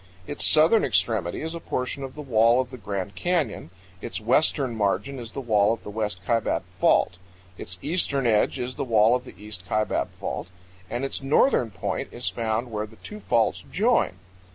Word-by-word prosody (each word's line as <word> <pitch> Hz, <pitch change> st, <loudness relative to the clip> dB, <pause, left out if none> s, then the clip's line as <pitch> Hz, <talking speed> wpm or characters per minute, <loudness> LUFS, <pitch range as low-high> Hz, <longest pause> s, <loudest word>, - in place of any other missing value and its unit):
Its 145 Hz, -, -4 dB
southern 160 Hz, +9 st, +5 dB
extremity 95 Hz, -, +1 dB
is 160 Hz, +1 st, -4 dB
a 170 Hz, -, -5 dB
portion 130 Hz, -2 st, -3 dB
of 135 Hz, -1 st, -7 dB
the 150 Hz, -, -7 dB
wall 115 Hz, -1 st, +4 dB
of 130 Hz, -1 st, -2 dB
the 130 Hz, -, -8 dB
Grand 100 Hz, -1 st, -4 dB
Canyon; 155 Hz, -, -1 dB, 0.3 s
its -, -, -4 dB
western 130 Hz, +2 st, +2 dB
margin 105 Hz, +6 st, -1 dB
is 115 Hz, -2 st, -8 dB
the -, -, -4 dB
wall 105 Hz, -4 st, +3 dB
of 115 Hz, -, -7 dB
the 105 Hz, -, -7 dB
West 105 Hz, -4 st, -3 dB
Kaibab 115 Hz, +2 st, +1 dB, 0.2 s
Fault; 90 Hz, -, +3 dB, 0.4 s
its 90 Hz, 0 st, -7 dB
eastern 145 Hz, -5 st, +1 dB
edge 110 Hz, +2 st, +2 dB
is 125 Hz, 0 st, -4 dB
the -, -, -1 dB
wall 115 Hz, -1 st, +4 dB
of 125 Hz, -, -3 dB
the -, -, -12 dB
East 105 Hz, -3 st, -7 dB
Kaibab 110 Hz, 0 st, 0 dB
Fault; -, -, -5 dB, 0.4 s
and 120 Hz, +3 st, -2 dB
its 135 Hz, -, -3 dB
northern 135 Hz, -, +3 dB
point 100 Hz, -, -4 dB
is -, -, -3 dB
found 115 Hz, +5 st, -1 dB
where 105 Hz, 0 st, -3 dB
the 110 Hz, -, -17 dB
two 210 Hz, -, -10 dB
faults 115 Hz, -, +1 dB
join. -, -, +2 dB
115 Hz, 190 wpm, -25 LUFS, 105-135 Hz, 0.4 s, southern